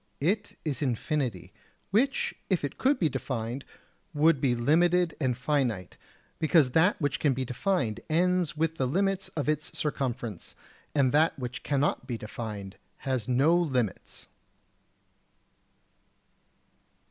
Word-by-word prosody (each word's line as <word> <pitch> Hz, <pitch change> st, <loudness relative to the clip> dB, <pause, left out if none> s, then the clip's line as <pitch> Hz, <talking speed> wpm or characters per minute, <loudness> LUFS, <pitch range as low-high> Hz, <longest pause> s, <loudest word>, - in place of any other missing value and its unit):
It 205 Hz, +8 st, 0 dB
is 145 Hz, -6 st, -2 dB
infinity, 130 Hz, -, -2 dB, 0.4 s
which 255 Hz, +7 st, +2 dB, 0.2 s
if 185 Hz, -6 st, +1 dB
it 145 Hz, -, -4 dB
could 275 Hz, +1 st, +3 dB
be 170 Hz, -, +2 dB
defined 130 Hz, -2 st, -3 dB, 0.5 s
would 150 Hz, -1 st, +4 dB
be 125 Hz, -3 st, +2 dB
limited 170 Hz, +7 st, +3 dB
and 125 Hz, -3 st, +1 dB
finite, 125 Hz, -, -1 dB, 0.4 s
because 155 Hz, -4 st, +4 dB
that 165 Hz, +8 st, +3 dB
which 145 Hz, -4 st, 0 dB
can 140 Hz, -4 st, +2 dB
be 130 Hz, 0 st, -2 dB
defined 125 Hz, -, -1 dB
ends 175 Hz, -1 st, +2 dB
with 165 Hz, +1 st, 0 dB
the 130 Hz, -, +1 dB
limits 195 Hz, +6 st, 0 dB
of 150 Hz, -, -1 dB
its 155 Hz, 0 st, -1 dB
circumference, 125 Hz, -, -3 dB, 0.4 s
and 135 Hz, -3 st, +3 dB
that 155 Hz, +4 st, +3 dB
which 125 Hz, -2 st, -5 dB
cannot 140 Hz, -2 st, 0 dB
be 120 Hz, -3 st, -3 dB
defined 105 Hz, -3 st, -7 dB, 0.2 s
has 130 Hz, -5 st, -2 dB
no 135 Hz, +7 st, +4 dB
limits. 130 Hz, -, -1 dB
140 Hz, 125 wpm, -28 LUFS, 125-165 Hz, 0.5 s, would